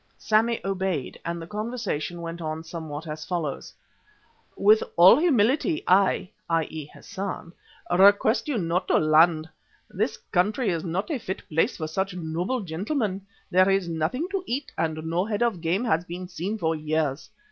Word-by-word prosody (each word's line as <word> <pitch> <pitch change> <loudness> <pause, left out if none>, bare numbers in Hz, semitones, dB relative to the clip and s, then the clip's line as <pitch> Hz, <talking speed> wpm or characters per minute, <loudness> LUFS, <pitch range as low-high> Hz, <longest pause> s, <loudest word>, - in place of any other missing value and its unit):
Sammy 225 +2 +2
obeyed, 190 -7 -2
and 170 0 -3
the 165 - -7
conversation 210 -6 -4
went 165 +1 -6
on 155 0 -4
somewhat 160 -2 -7
as 155 -1 -6
follows: 165 -5 -3 0.9
"With 215 +2 +5 0.2
all 185 +9 +8
humility 305 - +2
I 190 0 +3 0.2
(i.e. 160 -2 -1
Hassan) 190 -3 -6 0.4
request 200 +7 +5
you 285 -5 0
not 180 0 -1
to - - +4
land. 155 +1 +4 0.4
This - - -1
country 210 +7 0
is 165 -3 -1
not 185 - -2
a 285 - -1
fit 190 -4 -6
place 165 +1 +1
for 155 - -3
such 190 +4 -2
noble 175 +8 -2
gentlemen. 195 - -3 0.2
There 185 +1 +5
is 195 -2 +2
nothing 170 - -1
to 390 -2 -2
eat 265 +4 -3
and 155 -1 -2
no 170 +3 0
head 210 +2 -1
of 220 -8 0
game 180 +8 0
has 170 -7 +1
been 180 +1 -7
seen 185 +4 -4
for 165 -4 0
years. 155 -2 -2
180 Hz, 160 wpm, -25 LUFS, 160-210 Hz, 0.9 s, all